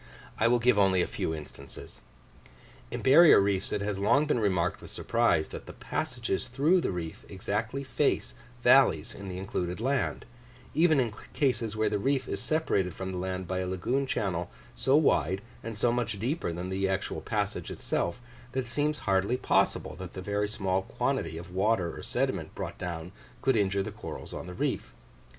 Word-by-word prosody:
I 115 - +4
will 120 +1 +4
give 120 -2 +3
only 95 -2 +4
a - - 0
few - - -3
instances. 70 -2 -10 0.9
In - - -5
barrier 155 +5 +8
reefs 100 -1 +1
it - - -1
has 100 -1 -2
long 140 +9 +4
been 145 -5 +1
remarked 90 -5 +1
with - - -10
surprise, 115 -9 +1
that - - -8
the - - -8
passages 95 +7 -2
through 150 +9 +3
the - - -1
reef 85 -3 -5
exactly 110 +7 -2
face 130 - 0 0.3
valleys - - +5
in 100 -1 -8
the 90 - -5
included 90 -1 -3
land, 130 +3 0 0.5
even 160 -2 +4
in 120 -5 0 0.2
cases 115 -6 0
where 110 0 +1
the 105 -1 0
reef 135 +3 +1
is 100 - -2
separated 100 - 0
from 95 0 -4
the 90 - -3
land 95 0 -3
by 95 +1 -1
a 95 - -2
lagoon 120 +9 0
channel 90 -7 -1 0.2
so 135 +2 +3
wide 95 - +2 0.2
and 115 -1 -5
so 120 +2 +3
much 120 -4 -1
deeper 125 - -1
than 90 +2 -4
the 95 +1 0
actual 95 0 -2
passage - - -2
itself, 85 +6 -2 0.3
that 130 - +1
it 125 - -8
seems 150 +5 0
hardly 100 +5 +2
possible 75 - +1
that 90 -1 -8
the - - -6
very 105 +1 0
small 95 -3 0
quantity 80 -3 -2
of 85 +2 -9
water 95 -2 +1
or - - -7
sediment - - -2
brought - - -5
down 85 0 -5 0.3
could 135 -2 +3
injure 100 -2 +2
the - - -5
corals - - -7
on - - -6
the 90 - -7
reef. - - -2
100 Hz, 185 wpm, -29 LUFS, 95-125 Hz, 0.9 s, barrier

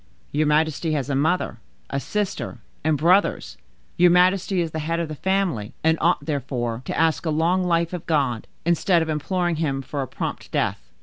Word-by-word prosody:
"Your 150 +1 +1
majesty 155 +1 +1
has 145 -1 -1
a - - +1
mother, 155 -4 0 0.3
a 140 - 0
sister, 210 +6 -3 0.3
and 155 -1 +2
brothers; 180 +7 +2 0.4
your 180 0 +6
majesty 185 +2 +3
is 165 -2 -1
the 160 - -3
head 165 +2 -1
of 165 -2 -2
the - - -4
family, 180 - -1
and 160 0 +4
ought, 175 +2 +2
therefore, 125 -6 -2
to - - -3
ask 160 -1 +2
a 165 - -1
long 165 +4 +2
life 170 -1 +1
of 180 - -6
God, 135 -8 0 0.2
instead 170 0 +3
of 160 - -5
imploring 175 +2 -1
Him 140 -4 -1
for 140 +1 -4
a 130 - -3
prompt - - -5
death. - - -1
160 Hz, 190 wpm, -23 LUFS, 145-175 Hz, 0.4 s, your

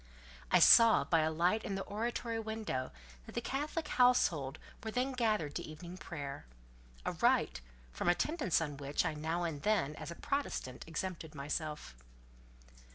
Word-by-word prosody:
I - - +6
saw 230 -1 +8
by 165 - +2
a 155 0 +2
light 175 +7 +1
in 195 - -3
the 195 - -3
oratory 230 +2 -3
window 220 -12 -3 0.4
that - - -11
the - - +1
Catholic 300 +3 -3
household 170 - +3 0.3
were 220 - -3
then 250 +4 0
gathered 215 - 0
to - - -3
evening 170 +3 -8
prayer—a - - -8
rite, - - +2 0.3
from 60 - -1
attendance 255 - +1
on 145 -3 -3
which, 145 +4 -1
I 160 - 0
now 160 +3 -2
and 160 -4 -3
then, 180 -8 +1
as - - -6
a 170 - -6
Protestant, 275 - -3
exempted 165 -1 -5
myself. 150 - -4
170 Hz, 155 wpm, -34 LUFS, 145-220 Hz, 0.4 s, saw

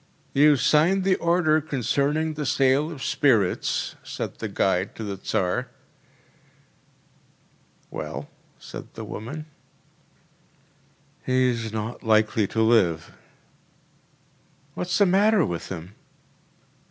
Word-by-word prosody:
“You 145 +1 +6
signed 160 +9 +3
the 190 0 +3
order 170 -2 +2
concerning 145 +3 0
the 150 0 -4
sale 140 +1 +2
of 140 -5 -8
spirits,‚ÄĚ 130 -9 +1
said - - -5
the - - -3
guide 95 0 0
to 115 - -6
the 100 -2 -4
Tsar. 90 -1 -1 2.2
‚ÄúWell?‚ÄĚ 70 +2 -5 0.3
said - - -10
the - - -6
woman. 145 +8 -7 1.8
“He’s 125 -3 +1
not 110 +2 -4
likely 110 -1 +2
to 110 +3 0
live.‚ÄĚ 90 -9 +2 1.6
“What’s 180 +2 -2
the 205 - +5
matter 195 0 +4
with 85 -1 -5
him? 90 +1 -7
130 Hz, 105 wpm, -24 LUFS, 110-155 Hz, 2.2 s, You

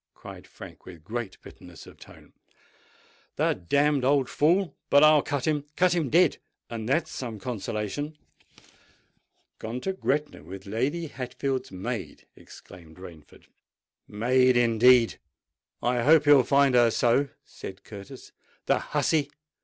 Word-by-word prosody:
cried - - -12
Frank, - - -13
with 85 -4 -12
great 115 0 -6
bitterness - - -13
of - - -16
tone. - - -16 1.0
"The - - +1
damned 140 - +1
old 135 0 +2
fool!—but 165 -3 +2
I'll 155 -1 +6
cut 145 -3 -3
him—cut 150 +4 0
him 165 -6 -1
dead—and 145 -8 -1
that's 155 +5 0
some 115 -4 -6
consolation." 110 +7 -5 1.4
"Gone 115 +3 -5
to 190 - -2
Gretna 150 -5 -2
with 95 +2 -10
Lady 130 +12 -2
Hatfield's 135 -2 -4
maid!" 95 -1 -6
exclaimed 85 -3 -15
Rainford. 85 -5 -14 0.6
"Maid, 125 +4 +2
indeed! 120 0 +4 0.6
I 120 0 +1
hope 150 +4 +5
he'll 145 -2 +7
find 140 +1 +3
her 120 -1 +5
so!" 120 +5 +1 0.2
said 95 +1 -10
Curtis. 100 -2 -11 0.3
"The - - +2
hussey! 150 -3 0
130 Hz, 120 wpm, -26 LUFS, 110-145 Hz, 1.4 s, he'll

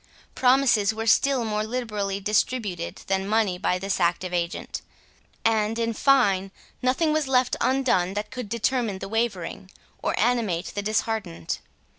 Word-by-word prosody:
Promises 250 -5 +3
were 225 0 -3
still 255 +2 +3
more 215 -1 -1
liberally 210 -4 -2
distributed 205 -3 -1
than 195 0 -1
money 210 -4 +1
by 180 - +1
this 195 +1 -2
active 175 +1 0
agent; 170 -1 -3 0.6
and, 220 0 +2
in 230 0 0
fine, 205 -8 +3 0.3
nothing 285 +5 +2
was 310 -2 0
left 255 -1 +2
undone 240 -9 +2
that 210 +2 -3
could 250 -5 -6
determine 235 -2 0
the 195 - -6
wavering, 200 -4 -2 0.3
or - - -1
animate 220 -7 +1
the 205 - -2
disheartened. 215 - -2
215 Hz, 140 wpm, -25 LUFS, 195-245 Hz, 0.6 s, Promises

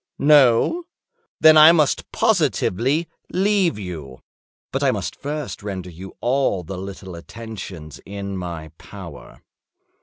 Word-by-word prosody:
No? 145 - +4 0.5
Then 155 0 +7
I 155 +1 +10
must 155 -5 +1
positively 155 - +1 0.2
leave 190 - +1
you. 80 -10 -8 0.5
But - - -2
I - - +3
must - - -3
first 145 -9 -5
render 95 -3 -6
you 95 +3 -11
all 120 -7 +1
the 90 +3 -7
little 95 -1 -8
attentions 90 -4 -9
in 100 0 -6
my 85 -4 -6
power." 90 -7 -12
100 Hz, 120 wpm, -21 LUFS, 90-150 Hz, 0.5 s, I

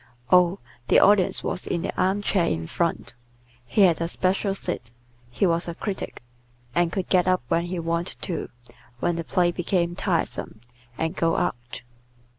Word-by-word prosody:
Oh, 180 +1 +5 0.3
the - - +5
Audience 200 -3 +4
was - - -3
in 170 -1 -1
the - - -3
arm 190 +3 +1
chair 185 -4 +2
in 80 0 -1
front. - - -2 0.5
He 130 - +2
had 170 -4 +5
a 165 - 0
special 195 +3 0
seat; 120 -10 -4 0.4
he 120 +11 0
was 170 -1 +1
a 170 - -4
critic, 195 - -5 0.5
and 175 -1 +2
could 190 -1 -2
get 180 -1 +3
up 185 -7 +2
when 170 +1 +1
he 180 +1 -4
wanted 170 +1 -2
to, 170 - -3 0.5
when 175 +5 0
the 170 - -3
play 175 +1 +2
became 175 0 0
tiresome, - - -2 0.4
and 160 +3 -2
go 165 -2 +1
out. 120 +1 -3
175 Hz, 170 wpm, -25 LUFS, 165-185 Hz, 0.5 s, Oh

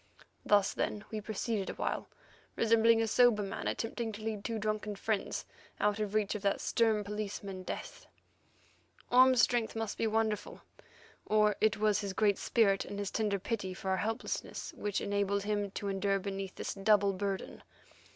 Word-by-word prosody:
Thus, 205 -1 +3
then, 210 0 -2
we 215 -1 -3
proceeded 215 -1 -2
awhile, - - -3 0.5
resembling 230 0 +4
a - - 0
sober 235 -2 +4
man 195 - -4
attempting 225 0 -2
to 210 +1 -8
lead 215 -2 -3
two 230 0 -2
drunken 215 -1 -2
friends 215 +1 -2 0.3
out 210 0 +1
of 210 -1 -2
reach 210 -2 +1
of 210 - -4
that 200 -1 +1
stern 220 -3 +2
policeman, 200 -2 -5
Death. 185 - -7 1.0
Orme's 255 0 +6
strength 240 -3 +1
must 225 -2 -3
be 225 - +2
wonderful; 220 -1 -1 0.6
or 210 -1 +3 0.2
was 210 -1 +3
it - - -3
his 200 -2 -3
great 205 -1 +2
spirit 200 -5 +3
and 200 - -7
his 200 -1 -3
tender 210 -3 0
pity 190 -2 -3
for 190 0 -3
our 190 - +2
helplessness 225 +4 -3
which 205 -1 -2
enabled 200 0 0
him 205 -1 -1
to 200 +1 -5
endure 195 0 +1
beneath 195 -1 -5
this - - -4
double 200 0 +3
burden. 195 0 -4
210 Hz, 165 wpm, -32 LUFS, 200-220 Hz, 1.0 s, Orme's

